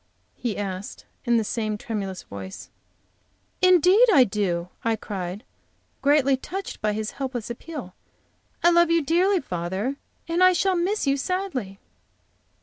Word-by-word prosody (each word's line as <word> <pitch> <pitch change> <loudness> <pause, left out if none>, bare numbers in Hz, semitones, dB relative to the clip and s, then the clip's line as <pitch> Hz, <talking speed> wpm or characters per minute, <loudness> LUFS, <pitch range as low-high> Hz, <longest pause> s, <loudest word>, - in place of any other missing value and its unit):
he 235 -4 -3
asked, 195 -1 -5 0.2
in 240 -1 +3
the 225 - +2
same 215 -1 -2
tremulous 205 -6 -4
voice. 95 -1 -9 0.9
"Indeed, 370 +6 +6
I 275 -9 +7
do!" 185 -5 -1
I 230 -1 +2
cried, 195 -1 -5 0.6
greatly 275 -1 +4
touched 370 +9 -6
by 210 0 +1
his 215 0 -3
helpless 250 -4 -3
appeal, 250 - -7 0.7
"I 345 - +6
love 345 -1 +5
you 335 -1 +3
dearly, 355 +5 +2
father. 190 +7 -3 0.3
And 335 +2 +2
I 370 0 +7
shall 380 +1 +2
miss 370 +4 0
you 275 0 +2
sadly." 275 - -3
255 Hz, 140 wpm, -24 LUFS, 205-345 Hz, 0.9 s, I